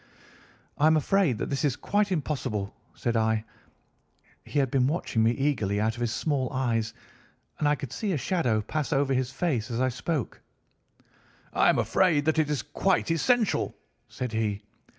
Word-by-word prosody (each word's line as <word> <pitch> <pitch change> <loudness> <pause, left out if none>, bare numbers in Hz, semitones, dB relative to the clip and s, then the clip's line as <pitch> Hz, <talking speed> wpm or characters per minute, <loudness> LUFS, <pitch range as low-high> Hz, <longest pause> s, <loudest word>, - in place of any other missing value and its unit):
"'I 150 - +5
am 160 0 +5
afraid 160 - +2
that - - -4
that 140 +2 -1
is 140 -4 +2
quite 205 +4 0
impossible,' 130 - -2 0.2
said 120 -1 -1
I. 110 -1 +1 1.0
He - - -5
had 135 -3 +2
been 130 -2 +3
watching 145 -7 0
me 110 - +4
eagerly 115 -6 0
out 110 +1 +1
of 120 - -8
his 120 -2 0
small 135 -1 -1
eyes, 115 -4 -1 0.6
and 150 - +2
I 145 - +3
could 140 -4 -7
see 210 -3 -2
a - - 0
shadow 130 - +1
pass 150 +7 -3
over 135 -1 +2
his 130 -1 0
face 130 -9 -1
as 115 -1 -2
I 130 0 +2
spoke. 135 +1 -3 1.1
"'I - - +4
am - - +3
afraid 160 -6 +2
that 160 0 +2
it 155 -2 +2
is 150 -3 -1
quite 175 +4 0
essential,' 225 +6 +1 0.3
said 125 -2 -4
he. 110 -2 -1
135 Hz, 175 wpm, -27 LUFS, 115-155 Hz, 1.1 s, I